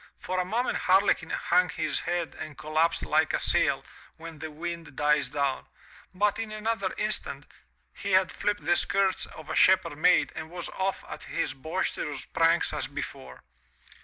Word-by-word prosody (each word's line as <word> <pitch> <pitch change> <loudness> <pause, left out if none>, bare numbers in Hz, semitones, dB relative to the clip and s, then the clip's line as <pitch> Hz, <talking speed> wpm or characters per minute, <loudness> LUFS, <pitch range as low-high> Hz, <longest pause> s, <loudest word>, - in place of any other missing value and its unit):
For 185 0 -3
a 180 - 0
moment 230 +7 0
Harlequin 185 -3 +3
hung 180 +1 +2
his 155 -3 -1
head 175 -2 -2
and 155 -2 -8
collapsed 155 +2 +1
like 155 0 +2
a - - +1
sail - - +2 0.3
when 165 -1 -10
the 160 - -5
wind 170 0 -6
dies 145 -2 +2
down, 140 -1 -1 0.4
but 205 +3 +1
in 225 -1 -4
another 220 +1 -2
instant, - - -2 0.5
he 200 -1 -4
had 185 0 +4
flipped 205 0 -2
the 175 - +4
skirts 195 +1 +2
of 155 - -12
a - - -3
shepherd 175 -5 +4
maid - - +4
and 160 0 -6
was 175 0 -5
off 190 0 -2
at - - -8
his - - -2
boisterous 150 -1 -3
pranks 165 +1 +2
as - - -2
before. 65 -1 -7
170 Hz, 165 wpm, -28 LUFS, 155-190 Hz, 0.5 s, had